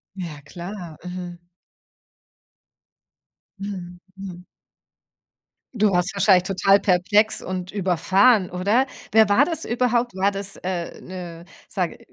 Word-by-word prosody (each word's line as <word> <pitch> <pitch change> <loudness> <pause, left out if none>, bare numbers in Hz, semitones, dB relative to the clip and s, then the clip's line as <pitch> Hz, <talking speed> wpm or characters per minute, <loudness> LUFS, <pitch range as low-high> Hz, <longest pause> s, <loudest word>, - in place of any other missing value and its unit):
Ja 170 -6 -6
klar. 175 +1 -8
Mhm. 180 -1 -6 2.2
Mhm. 185 -3 -6 0.2
Mhm. 185 -2 -8 1.3
Du 215 -2 +3
warst 180 +1 0
wahrscheinlich 195 -2 +4
total 195 +1 +3
perplex 205 +4 +2
und 185 0 -4
überfahren, 190 +3 +3
oder? 205 +9 +2 0.3
Wer 220 0 +6
war 205 +8 +5
das 330 +1 -4
überhaupt? 240 -1 +1
War 195 +2 +2
das, 200 0 -5
äh, 180 -2 -4
'ne, 175 -2 -8 0.2
sage - - -2
190 Hz, 110 wpm, -23 LUFS, 180-205 Hz, 2.2 s, Wer